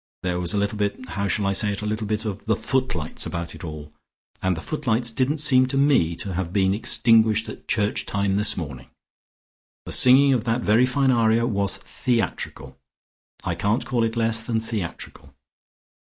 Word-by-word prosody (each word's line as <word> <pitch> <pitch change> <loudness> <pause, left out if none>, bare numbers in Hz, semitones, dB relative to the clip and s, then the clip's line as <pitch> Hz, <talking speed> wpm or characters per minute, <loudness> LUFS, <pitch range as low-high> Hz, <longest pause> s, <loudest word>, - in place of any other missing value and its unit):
There 90 -1 -1
was 90 -1 -1
a - - +1
little 100 +1 -1
bit 105 +5 -3
how 100 0 -2
shall 100 +1 0
I 100 - +1
say 105 +1 +2
it? 100 - -6
a - - -3
little 110 0 -3
bit 110 +1 -2
of 105 -1 -5
the 110 - +2
footlights 130 - -2
about 85 0 -5
it - - -11
all. 75 -2 -8 0.5
And 95 -2 0
the - - -5
footlights 120 - -1
didn't 130 +5 0
seem 130 -4 +4
to 135 - -2
me 135 - +3
to 95 +2 -4
have 90 -1 -3
been 95 -1 +2
extinguished 110 0 +3
at - - -10
church 105 -1 -1
time 100 -1 -1
this 105 +2 +2
morning. 70 -7 -6 1.0
The - - -7
singing 135 +2 +6
of 120 -4 0
that 115 +1 0
very 115 +3 +3
fine 135 +1 +2
aria 115 -1 +2
was 100 -5 -1
theatrical, 90 - -3 0.6
I 85 - -2
can't 105 +7 -1
call 120 -3 0
it 115 0 -1
less 115 -1 +1
than 115 -1 -1
theatrical." 110 -6 -7
110 Hz, 190 wpm, -23 LUFS, 95-120 Hz, 1.0 s, singing